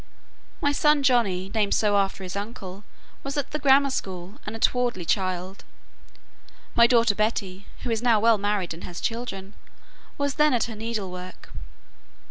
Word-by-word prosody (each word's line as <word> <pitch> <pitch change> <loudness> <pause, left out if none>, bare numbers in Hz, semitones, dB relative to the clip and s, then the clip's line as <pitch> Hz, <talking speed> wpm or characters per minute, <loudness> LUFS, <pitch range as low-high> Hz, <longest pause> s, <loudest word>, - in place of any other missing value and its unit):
My 285 - +2
son 295 0 +3
Johnny, 200 -8 +2
named 210 -3 +2
so 210 -1 +2
after 195 -1 0
his 185 +1 -6
uncle, 200 -2 -6 0.4
was 275 +1 -4
at 285 - -2
the 300 - -2
grammar 275 -1 +5
school, 190 +1 -5
and 215 - -4
a - - -7
towardly 240 -7 +1
child. 185 0 -2 1.1
My 235 0 +6
daughter 230 -3 +4
Betty 200 -3 -2 0.2
(who 245 - -2
is 225 -1 0
now 235 -3 +4
well 225 0 +4
married, 200 -4 -1
and 165 - -11
has 175 0 -7
children) 220 -5 -4 0.6
was 285 -1 0
then 300 -4 +5
at 235 - +1
her 225 - -5
needlework. 195 -5 -6
215 Hz, 160 wpm, -25 LUFS, 190-245 Hz, 1.1 s, My